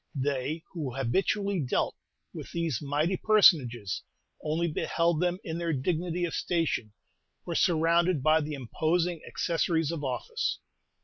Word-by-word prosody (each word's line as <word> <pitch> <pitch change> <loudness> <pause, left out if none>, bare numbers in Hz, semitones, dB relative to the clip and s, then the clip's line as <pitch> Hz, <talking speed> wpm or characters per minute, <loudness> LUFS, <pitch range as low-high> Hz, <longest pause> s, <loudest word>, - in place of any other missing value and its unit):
They 140 +3 -1
who 145 -8 -4
habitually 195 - 0
dealt 130 -5 0 0.4
with - - -8
these 165 -6 -1
mighty 150 +6 0
personages 130 - +4 0.4
only 160 +3 0
beheld 165 +1 0
them 180 0 +1
in 165 0 -4
their 170 -1 -1
dignity 170 +5 -1
of 165 - -4
station, 165 - -1 0.5
or 175 - -3
surrounded 170 -2 +3
by 155 +2 +4
the 150 0 -4
imposing 160 +6 -1
accessories 165 -2 0
of 160 -3 -4
office. 125 -4 -2
160 Hz, 130 wpm, -29 LUFS, 145-175 Hz, 0.5 s, personages